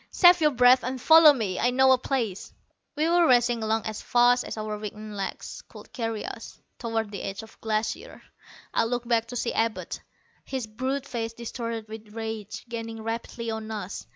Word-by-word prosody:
"Save 350 -1 +6
your 305 - +5
breath 250 -1 +5
and 255 +1 -3
follow 320 +3 +8
me. 215 -9 -2
I 245 - +3
know 265 +1 +4
a 260 - +6
place." 235 -8 -2 0.4
We 305 +2 +1
were 340 0 +4
racing 240 -2 +3
along 220 0 0
as 215 -1 -4
fast 245 +1 +4
as - - -6
our 215 0 -3
weakened 210 0 -7
legs 195 -1 -5
could - - -14
carry 225 -3 -3
us, - - -8 0.2
toward 225 -3 -2
the 200 - -5
edge 195 +3 -5
of 220 - -13
the - - -22
Glacier. 220 0 -3 0.5
I - - +2
looked 240 +1 -2
back 230 -1 +2
to 245 - -7
see 240 - -1
Abud, 225 -1 -1 0.4
his 260 -3 -4
brute 260 +5 -3
face 230 -4 -4
distorted 230 -1 -5
with 215 0 -10
rage, 220 -3 -5
gaining 225 -1 -6
rapidly 230 0 -4
on 220 0 -5
us. 195 - -6
230 Hz, 190 wpm, -26 LUFS, 220-250 Hz, 0.5 s, follow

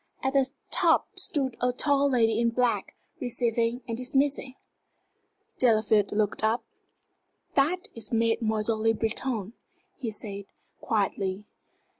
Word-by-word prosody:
At 265 0 0
the 270 -1 +3 0.2
top - - +2
stood 265 -6 -1
a 250 0 +2
tall 280 +2 +2
lady 225 -4 +2
in 235 0 +3
black, 240 0 0 0.2
receiving 235 -2 -1
and 230 - -2
dismissing. 265 +1 0 1.0
Delafield 215 -4 +3
looked 210 0 0
up. 225 +2 +1 0.9
"That 330 +7 +1
is 225 -3 -1
Mademoiselle 225 -1 +1
Le 225 0 +3
Breton," 225 -1 -2 0.4
he 250 -6 -3
said, 200 -2 -6 0.3
quietly. 200 -2 -1
230 Hz, 115 wpm, -27 LUFS, 220-255 Hz, 1.0 s, the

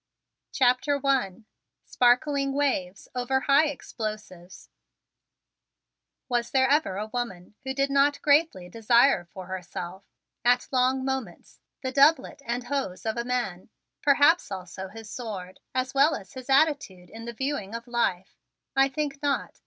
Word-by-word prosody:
CHAPTER 265 +3 +2
I 240 -6 0 0.4
SPARKLING 275 +3 +2
WAVES 200 -10 -1
OVER 255 +1 0
HIGH 285 +4 +4
EXPLOSIVES 215 -9 -7 1.6
Was 240 -2 -1
there 260 -1 +3
ever 275 -9 +2
a 210 - -2
woman 205 -7 -4
who 265 0 -4
did 275 0 +1
not 280 +1 +4
very - - -16
greatly 290 - +3
desire 230 0 +3
for 185 +1 -10
herself, 185 0 -7 0.4
at 245 +1 +3
long 260 0 +2
moments, 265 -10 -5 0.2
the 260 - -2
doublet 280 +1 +3
and 240 +1 -2
hose 255 -8 -3
of 220 - -1
a 235 - -2
man, 240 -8 -3 0.3
perhaps 290 +4 +4
also 190 0 -6
his 220 +3 -11
sword, 200 -6 -7 0.2
as 255 0 -1
well 280 +4 +4
as 195 - -10
his 260 0 -10
attitude 270 - +1
in 225 +1 -9
the 235 - -6
viewing 235 -5 -3
of 230 0 -6
life? 195 -6 -1 0.4
I 270 0 +4
think 280 0 -3
not. 285 -1 -2
245 Hz, 145 wpm, -26 LUFS, 200-275 Hz, 1.6 s, HIGH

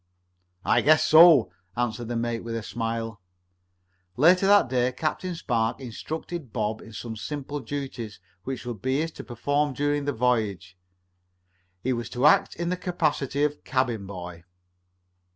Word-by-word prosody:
"I 120 - +4
guess 155 +3 +5
so," 160 -5 +7 0.3
answered 120 -1 -2
the 120 - -3
mate 115 0 -2
with 115 0 -4
a 115 - -3
smile. 115 -2 -4 1.0
Later 180 +7 +5
that 205 -6 +6
day 125 0 +1
Captain 160 +6 -3
Spark 115 -7 -1
instructed 145 +3 -6
Bob 110 -1 -2
in 115 - -12
some 110 +2 -6
simple 145 +4 -5
duties 130 -7 -6 0.2
which 130 -2 -5
would 120 -5 -6
be 130 +2 0
his 165 +1 -1
to - - -9
perform 145 +4 -1
during 145 +1 0
the 145 - +1
voyage. 110 -7 0 1.1
He 130 - +1
was 120 -1 -4
to 125 +3 -1
act 150 - +5
in 170 +1 -2
the 180 - -1
capacity 150 -6 -1
of 150 0 -1
cabin 125 -6 -1
boy. 90 -3 -8
125 Hz, 150 wpm, -26 LUFS, 115-150 Hz, 1.1 s, so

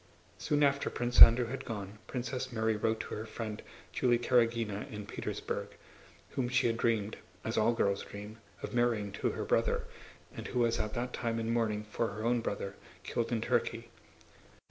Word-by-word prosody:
Soon 150 0 +1
after 140 0 +2
Prince 120 0 +1
Andrew 120 +2 +11
had 130 +3 -5
gone, 105 -3 -6
Princess 130 +1 -3
Mary 110 -1 +1
wrote 110 +1 0
to - - -7
her 110 +1 -5
friend 110 -1 -5 0.3
Julie 120 -2 +3
Karágina 115 -4 +1
in 105 -2 -6
Petersburg, - - -4 0.6
whom 130 -3 -1
she 130 0 +2
had 115 -1 +2
dreamed 110 -3 0 0.3
(as 110 - -2
all 110 +2 +3
girls 100 -3 +1
dream) 105 +2 -9 0.2
of - - -5
marrying 120 -4 +1
to 100 - -1
her - - -3
brother, - - +1 0.5
and - - -6
who 125 - -2
was 115 -1 +2
at 105 0 -2
that 125 +1 -3
time 115 -1 -1
in 115 +1 -1
mourning 110 -3 0
for 110 +2 -2
her 105 +1 -6
own 120 +1 +3
brother, 100 -2 -3 0.3
killed 115 +3 -2
in 115 -2 0
Turkey. - - -1
115 Hz, 180 wpm, -32 LUFS, 105-120 Hz, 0.6 s, Andrew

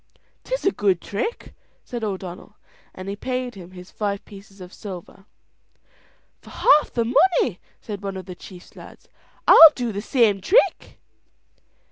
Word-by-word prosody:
"'Tis - - -4
a 390 - +4
good 195 - 0
trick," 220 - -5 0.3
said 240 -2 -7
O'Donnell; 190 -3 -6 0.3
and 185 +1 -10
he 200 - -4
paid 255 +2 -4
him 180 -4 -12
his 180 0 -13
five 200 -2 -4
pieces 200 0 -15
of 180 0 -11
silver. 195 -1 -10 1.2
"For - - -16
half 295 +1 +3
the 235 -1 -1
money," 255 - +2 0.2
said 205 -3 -7
one 195 -1 -5
of 185 - -8
the 180 - -8
chief's 180 0 -14
lads, - - -14 0.4
"I'll 325 - +10
do 240 -3 -3
the 200 0 -5
same 220 -5 +1
trick." 415 - +1
205 Hz, 150 wpm, -22 LUFS, 190-245 Hz, 1.2 s, I'll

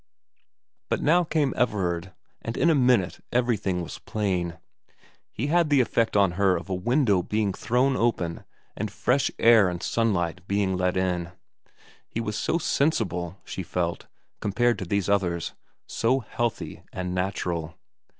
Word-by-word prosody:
But - - +1
now 175 +4 +4
came 155 -5 0
Everard, 95 -6 0 0.3
and 115 - -5
in 170 - +4
a - - +4
minute 125 - +2
everything 105 -7 0
was - - -8
plain. 90 -5 -2 0.7
He 120 - -3
had 165 +1 +2
the 145 -2 +4
effect 115 -3 +2
on 100 -3 +4
her 95 -2 +4
of 95 - -7
a - - +1
window 105 +1 +2
being 105 +1 -1
thrown 125 +6 +1
open 100 -9 0 0.3
and - - -3
fresh 135 +3 +1
air 115 -4 +6
and 90 -1 -5
sunlight 95 -6 0
being 100 -1 +1
let 90 0 0
in. 90 -2 -1 0.7
He - - -4
was 105 -2 -3
so 160 - 0
sensible, 100 - 0
she - - -5
felt, 85 -1 -3 0.3
compared 120 +4 +1
to 95 - -4
these 100 +1 0
others; 90 -4 0 0.3
so 130 +4 +1
healthy 120 0 -3
and 90 -1 -4
natural. 90 -3 -2
100 Hz, 150 wpm, -26 LUFS, 90-120 Hz, 0.7 s, air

